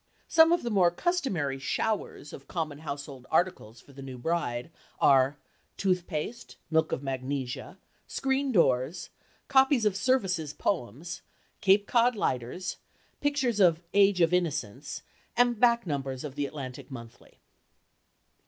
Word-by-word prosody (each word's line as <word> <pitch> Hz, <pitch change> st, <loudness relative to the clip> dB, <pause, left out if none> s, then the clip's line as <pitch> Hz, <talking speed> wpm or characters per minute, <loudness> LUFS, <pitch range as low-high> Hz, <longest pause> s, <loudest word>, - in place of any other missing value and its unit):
Some 320 Hz, 0 st, +6 dB
of 345 Hz, -, +2 dB
the 240 Hz, -, -2 dB
more 185 Hz, -4 st, +5 dB
customary 175 Hz, -, -1 dB
"showers" 200 Hz, 0 st, -2 dB
of 135 Hz, -, -11 dB
common 155 Hz, -4 st, -3 dB
household 140 Hz, -4 st, -7 dB
articles 160 Hz, -10 st, 0 dB
for 140 Hz, -, -18 dB
the 135 Hz, -, -10 dB
new 130 Hz, -2 st, -7 dB
bride 125 Hz, -2 st, -2 dB, 0.3 s
are 135 Hz, +1 st, +4 dB, 0.4 s
toothpaste, 180 Hz, +2 st, -2 dB
milk 160 Hz, 0 st, +2 dB
of 135 Hz, -, -2 dB
magnesia, 135 Hz, +4 st, -4 dB, 0.3 s
screen 270 Hz, 0 st, 0 dB
doors, 135 Hz, -, +1 dB, 0.4 s
copies 265 Hz, -3 st, +4 dB
of 205 Hz, -3 st, +2 dB
Service's 190 Hz, -, 0 dB
poems, 160 Hz, -, -3 dB, 0.4 s
Cape 200 Hz, +1 st, +4 dB
Cod 240 Hz, +2 st, +3 dB
lighters, 130 Hz, -, -2 dB, 0.4 s
pictures 270 Hz, -6 st, 0 dB
of 175 Hz, -3 st, +4 dB
"Age 200 Hz, -2 st, +4 dB
of 165 Hz, +1 st, +4 dB
Innocence" 150 Hz, -, -2 dB, 0.3 s
and 240 Hz, -2 st, +3 dB
back 235 Hz, -1 st, +4 dB
numbers 135 Hz, -4 st, -3 dB
of 150 Hz, -3 st, -6 dB
the 145 Hz, 0 st, -2 dB
"Atlantic 135 Hz, -3 st, -8 dB
Monthly." 115 Hz, -3 st, -12 dB
165 Hz, 130 wpm, -28 LUFS, 135-210 Hz, 0.4 s, Some